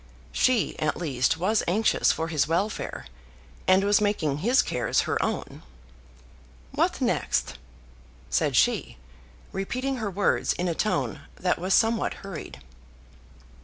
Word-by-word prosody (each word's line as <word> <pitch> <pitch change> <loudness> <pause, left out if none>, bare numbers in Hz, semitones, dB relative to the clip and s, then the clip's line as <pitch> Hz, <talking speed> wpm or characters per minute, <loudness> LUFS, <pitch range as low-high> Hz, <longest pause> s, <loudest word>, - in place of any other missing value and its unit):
She 245 - +1
at 155 0 0
least 145 -2 0
was 205 +6 +1
anxious 210 +6 +3
for 160 0 -2
his 155 -3 +1
welfare, 180 - -2 0.6
and 185 +1 +5
was 205 +1 +3
making 160 -9 0
his 240 - +3
cares 120 -3 0
her - - -1
own. - - -4 1.1
"What - - 0
next?" - - 0 0.7
said - - 0
she, - - +2 0.5
repeating 255 +7 -2
her 220 -4 -2
words 200 +1 +1
in 180 - -2
a 170 - 0
tone 215 +6 -1
that 180 - 0
was 185 +2 +2
somewhat 225 -2 +1
hurried. 190 - -8
190 Hz, 130 wpm, -26 LUFS, 160-215 Hz, 1.1 s, and